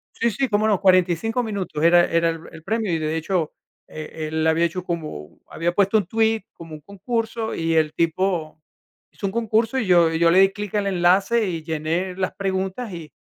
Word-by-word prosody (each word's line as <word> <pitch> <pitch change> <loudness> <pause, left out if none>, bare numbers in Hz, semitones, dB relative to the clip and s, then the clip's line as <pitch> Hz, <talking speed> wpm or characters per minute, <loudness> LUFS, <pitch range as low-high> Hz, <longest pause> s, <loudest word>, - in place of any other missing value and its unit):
Sí, 235 - +1
sí, 260 +5 -1
cómo 210 0 +1
no, 205 -4 +2
45 185 +5 +2
minutos 195 -8 -4
era 175 +1 +6
era 165 0 +1
el 165 -1 -6
el 160 - -12
premio, 215 -1 -1
y 165 - +1
de 155 +1 -2
hecho, 160 -1 -1 0.3
eh, 155 0 -7
él 160 0 -1
había 160 +1 +3
hecho 180 +2 -2
como 155 - -6
había 170 +2 -2
puesto 200 +3 +3
un 195 - -2
tweet, 225 0 +1
como 165 -2 -11
un 150 - -10
concurso, 225 - -3
y 165 0 -1
el 155 -1 +1
tipo 165 -2 -1 0.5
hizo 200 - -5
un 195 - -3
concurso, 225 +2 0
y 225 - -1
yo 175 -3 +5
y 160 - -1
yo 170 0 +4
le 185 +3 +5
di 195 0 +5
clic 210 -1 -7
al 205 -1 0
enlace 195 +5 +2
y 165 -3 -3
llené 165 +4 -2
las 185 -1 -2
preguntas, 190 +3 -3
y 165 -3 -9
180 Hz, 210 wpm, -22 LUFS, 165-210 Hz, 0.5 s, era